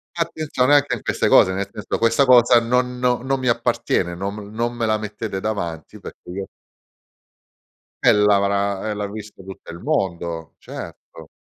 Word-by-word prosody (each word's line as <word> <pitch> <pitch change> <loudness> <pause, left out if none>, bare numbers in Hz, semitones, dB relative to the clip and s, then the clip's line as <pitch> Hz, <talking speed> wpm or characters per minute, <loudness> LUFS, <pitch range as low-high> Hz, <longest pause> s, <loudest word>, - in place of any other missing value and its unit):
Attenzione 155 -5 +1
anche 145 -3 +2
in 115 - -9
queste - - 0
cose, 95 - +6
nel 100 +1 -3
senso: 105 -1 -4
"Questa 115 +4 +3
cosa 120 -2 +6
non 125 +1 0
no 125 -1 +1
non 135 0 0
mi 130 - -3
appartiene 90 -6 0
non 95 +3 -4
m 105 0 -9
non 120 +2 -1
me 120 -1 -2
la 110 0 +1
mettete 105 -1 -5
davanti 85 -7 -4
perché - - -11
io" 95 +1 -5 1.6
Eh, - - +7
l'avrà 100 0 +2
eh, 105 - -1
l'ha 105 0 -3
visto 105 -1 -10
tutto 95 0 -10
il 85 - -8
mondo, 85 - -3
certo. - - -10
105 Hz, 170 wpm, -21 LUFS, 100-125 Hz, 1.6 s, Eh